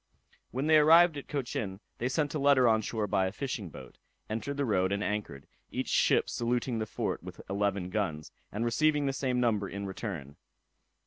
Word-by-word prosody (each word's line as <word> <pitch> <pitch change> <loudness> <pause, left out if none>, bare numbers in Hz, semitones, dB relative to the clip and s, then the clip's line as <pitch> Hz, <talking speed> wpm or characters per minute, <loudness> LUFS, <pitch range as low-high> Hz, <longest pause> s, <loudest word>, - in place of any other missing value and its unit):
When 130 +5 -2
they 155 0 +6
arrived 165 +2 +7
at 140 - -7
Cochin, 120 -9 -3 0.2
they 120 - 0
sent 145 +2 0
a 155 - -1
letter 140 -3 +5
on 110 -1 +4
shore 110 0 -2
by 95 -1 +1
a - - -3
fishing 110 -5 -4
boat, - - -12 0.3
entered 115 +6 -3
the 140 - +1
road, 95 -5 +1
and 100 +1 0
anchored, 100 -11 -3 0.2
each - - -3
ship - - +3
saluting 120 0 -1
the 110 - -2
fort - - -3
with - - -10
eleven 100 -2 -1
guns, 90 -8 -2 0.2
and 110 +3 -2
receiving 150 +4 +2
the 135 - 0
same 130 -2 0
number 105 -5 +1
in 100 +1 -5
return. 95 - -6
115 Hz, 190 wpm, -30 LUFS, 100-135 Hz, 0.3 s, arrived